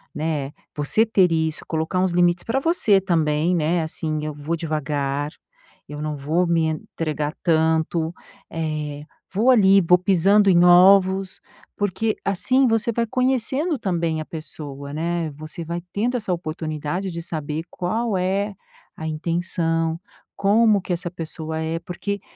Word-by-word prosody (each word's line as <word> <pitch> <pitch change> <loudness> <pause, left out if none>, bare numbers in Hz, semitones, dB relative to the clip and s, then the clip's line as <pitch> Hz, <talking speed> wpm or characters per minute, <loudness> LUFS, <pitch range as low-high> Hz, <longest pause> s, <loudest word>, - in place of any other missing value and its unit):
né, 150 -3 -2 0.2
você 150 +10 +2
ter 190 -5 +3
isso, 160 -1 -1
colocar 160 +3 -1
uns 185 -1 +2
limites 175 0 +3
pra 255 +4 0
você 270 - +3
também, 165 -1 +1
né, 165 +1 +1
assim: 155 -1 -2
"Eu 155 - -3
vou 150 +3 -3
devagar, 145 -3 -2 0.6
eu 150 0 -6
não 150 -1 -3
vou 160 +6 0
me 165 -1 +2
entregar 155 -1 -3
tanto, 160 0 +1 0.4
eh, 150 -3 -3 0.3
vou 230 +7 +4
ali 195 -5 +6
vou 180 +1 +5
pisando 195 +3 +4
em 175 -1 +5
ovos." 190 +1 +5 0.4
Porque 205 +2 0
assim 255 +8 +2
você 225 +1 +1
vai 235 +1 0
conhecendo 260 +5 0
também 170 -4 -1
a - - -6
pessoa, 145 -3 -7
né, 165 0 -2
você 155 +3 -8
vai 170 +1 -4
tendo 240 +5 0
essa 215 -5 -3
oportunidade 160 +2 -4
de 170 0 -5
saber 155 -2 -4
qual 215 +3 -1
é 195 +2 -1 0.4
a 160 - -7
intenção, 165 0 -1 0.4
como 210 0 +3
que 180 - -3
essa 175 0 -3
pessoa 160 -2 -5
é. 160 +1 -2
Porque, 195 +4 -5
170 Hz, 145 wpm, -22 LUFS, 155-195 Hz, 0.6 s, ali